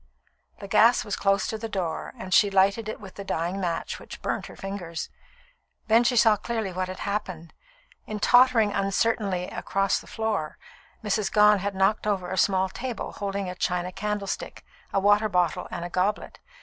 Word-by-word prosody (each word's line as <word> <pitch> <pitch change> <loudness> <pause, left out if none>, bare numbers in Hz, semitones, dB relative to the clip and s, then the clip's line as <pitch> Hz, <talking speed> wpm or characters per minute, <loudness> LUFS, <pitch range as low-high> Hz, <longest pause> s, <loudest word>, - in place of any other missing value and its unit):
The 200 - -8
gas 220 +3 +4
was 205 - -2
close 195 0 +1
to 220 - -4
the 225 +1 -5
door, 180 -6 -3
and 185 0 -5
she 205 - +6
lighted 200 +3 +2
it - - -6
with 195 -2 -11
the 200 - -8
dying 175 +1 -2
match, 170 -2 -3
which - - -10
burnt - - -2
her - - -12
fingers. 190 -4 -6 0.8
Then 225 +1 +4
she 245 +1 +2
saw 220 -2 +5
clearly 220 -3 -3
what 185 +1 -2
had 185 0 -7
happened. 185 -5 -4 0.5
In 215 -1 -4
tottering 245 -2 +5
uncertainly 195 -1 0
across 195 0 0
the - - -15
floor, 215 -9 -2 0.5
Mrs. 210 -1 0
Gone 210 -1 +5
had 200 +1 -3
knocked 195 +3 +1
over 190 -4 -1
a - - -1
small 190 0 +3
table 240 +5 -5
holding 200 -1 -3
a 180 - -4
china 180 0 -2
candlestick, 205 0 -4 0.3
a - - +2
water 205 +2 +3
bottle, 180 -4 0
and 170 - -5
a - - -5
goblet. 195 +3 -1
200 Hz, 180 wpm, -26 LUFS, 185-215 Hz, 0.8 s, she